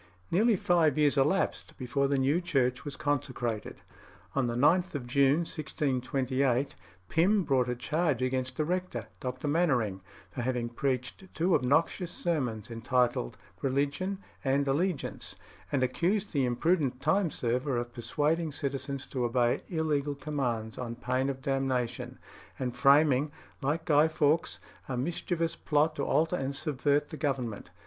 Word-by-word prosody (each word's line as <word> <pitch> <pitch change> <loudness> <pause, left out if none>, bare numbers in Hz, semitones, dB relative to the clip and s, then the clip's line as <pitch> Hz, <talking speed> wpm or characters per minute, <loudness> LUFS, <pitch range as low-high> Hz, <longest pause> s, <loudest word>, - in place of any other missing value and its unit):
Nearly 215 +6 +4
five 175 -7 +3
years 150 -2 +4
elapsed 150 +8 +1
before 140 +1 0
the 140 0 +1
new 140 +6 +2
church 130 -7 0
was 145 -2 -6
consecrated. 125 -6 -2 0.5
On 135 -3 +1
the 120 - -2
9th 170 +7 +3
of 135 -4 -3
June 140 +4 +3
1628 135 -3 0 0.3
Pym 190 - +3
brought 130 -5 +2
a 125 - -1
charge 150 +1 0
against 130 0 -1
the 155 - +1
rector, 180 +2 -2
Dr. 130 +3 -4
Mainwaring, 130 - +1 0.3
for 105 - -4
having 120 -1 -1
preached 130 +7 -2
two 175 +3 +2
obnoxious 160 +6 +2
sermons, 125 - -2
entitled 120 - 0 0.2
"Religion" 140 +8 0 0.3
and 140 +1 +1
"Allegiance," 155 +3 -1 0.4
and 135 -3 +2
accused 190 +10 0
the 140 -4 +2
imprudent 135 +1 +1
time 170 +6 +2
server 125 0 -1
of 120 0 -3
persuading 150 +6 0
citizens 140 -1 -3
to 130 -2 -3
obey 120 0 +2
illegal 150 -4 0
commands 130 -6 -3
on 120 -2 -4
pain 130 +3 -1
of 130 -1 -5
damnation, 130 -3 -1 0.4
and 125 -2 -3
framing, 140 +1 +4 0.3
like 155 +5 -1
Guy 150 -1 +5
Faux, 155 +1 +1 0.3
a 125 - -2
mischievous 165 +4 -1
plot 150 +1 +1
to - - -1
alter 165 +3 +2
and 135 +1 -2
subvert 145 0 +1
the 155 - -7
Government. 130 -8 -2
140 Hz, 140 wpm, -30 LUFS, 125-155 Hz, 0.5 s, Guy